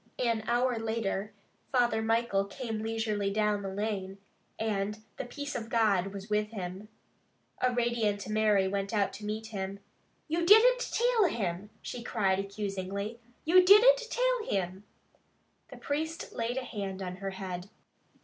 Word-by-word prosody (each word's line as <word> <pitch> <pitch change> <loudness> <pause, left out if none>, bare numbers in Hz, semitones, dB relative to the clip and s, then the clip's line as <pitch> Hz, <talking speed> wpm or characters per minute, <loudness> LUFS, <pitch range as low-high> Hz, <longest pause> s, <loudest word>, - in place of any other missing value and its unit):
An 230 -3 +1
hour 240 0 +2
later 220 -2 -2 0.4
Father 240 -4 +2
Michael 225 -3 +1
came 220 +1 -5
leisurely 220 -2 -1
down 210 0 +1
the 195 - -4
lane, 195 -1 -3 0.4
and 210 -1 -2
the - - -4
peace 285 +4 -6
of 225 0 -4
God 210 -6 +3
was 195 0 -7
with 210 0 +1
him. 190 -1 -6 0.7
A 255 - +3
radiant 235 -5 0
Mary 215 -2 +3
went 195 +2 -2
out 200 -2 +1
to 210 - -8
meet 215 +1 -3
him. 195 -2 -4 0.5
"You 335 +2 0
didn't 445 +7 +7
till 485 -2 +2
him!" 200 - -2
she 245 - -5
cried 195 -5 +1
accusingly. 200 +2 -4 0.3
"You 365 +3 +7
didn't 445 +7 +8
till - - +1
him!" 190 +1 -2 0.8
The - - -10
priest 315 +3 -3
laid 235 +2 -2
a 265 - -1
hand 195 -4 -5
on 180 0 -5
her 195 0 -4
head. 190 -1 -6
215 Hz, 150 wpm, -30 LUFS, 195-245 Hz, 0.8 s, didn't